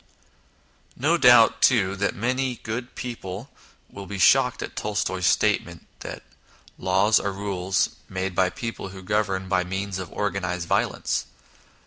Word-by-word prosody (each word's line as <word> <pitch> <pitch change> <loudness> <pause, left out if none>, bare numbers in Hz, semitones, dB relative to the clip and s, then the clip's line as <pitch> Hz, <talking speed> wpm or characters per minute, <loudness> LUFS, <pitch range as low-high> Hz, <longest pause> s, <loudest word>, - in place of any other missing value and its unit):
No 155 +6 +2
doubt, 120 -6 +6
too, 100 -6 +4 0.2
many 125 +3 -1
good 120 +3 -5
people 115 -1 -6 0.4
will 100 -1 -10
be 100 - -5
shocked 130 +6 +4
at - - -8
Tolstoy's 95 -3 -1
statement 90 -4 +1
that - - -8 0.3
" - - -27
Laws 95 +4 +3
are 100 - -2
rules 95 -2 -1 0.2
made 95 0 -3
by 95 +1 +2
people 115 +4 -6
who 95 0 -10
govern 95 -1 -1
by 95 -1 +1
means 95 +1 -4
of 95 -3 -7
organised 90 -4 -2
violence." - - 0
100 Hz, 135 wpm, -24 LUFS, 95-115 Hz, 0.4 s, doubt